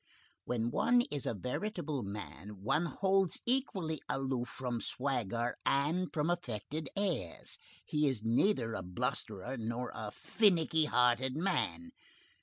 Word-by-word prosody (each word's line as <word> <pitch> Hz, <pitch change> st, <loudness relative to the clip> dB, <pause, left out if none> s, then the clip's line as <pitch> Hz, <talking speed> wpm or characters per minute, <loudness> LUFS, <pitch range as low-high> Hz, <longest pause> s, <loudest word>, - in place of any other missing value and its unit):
When 120 Hz, -1 st, 0 dB
one 240 Hz, -, +4 dB
is 145 Hz, -2 st, -2 dB
a -, -, 0 dB
veritable 155 Hz, -, -2 dB
man, 100 Hz, -1 st, -7 dB
one 150 Hz, +9 st, +2 dB
holds 190 Hz, -1 st, +2 dB
equally 195 Hz, -, 0 dB
aloof 130 Hz, -3 st, -1 dB
from 120 Hz, 0 st, -3 dB
swagger 120 Hz, -3 st, -1 dB
and 155 Hz, +7 st, +2 dB
from 150 Hz, -1 st, 0 dB
affected 150 Hz, -, -3 dB
airs. 180 Hz, -, -2 dB, 0.3 s
He 150 Hz, -1 st, +2 dB
is 125 Hz, -6 st, 0 dB
neither 115 Hz, -, +2 dB
a -, -, -2 dB
blusterer 110 Hz, +4 st, -3 dB
nor 115 Hz, +2 st, -2 dB
a 110 Hz, -2 st, -4 dB
finnicky 165 Hz, -, +3 dB
hearted 125 Hz, 0 st, +3 dB
man. 195 Hz, +8 st, 0 dB
135 Hz, 125 wpm, -34 LUFS, 115-170 Hz, 0.3 s, one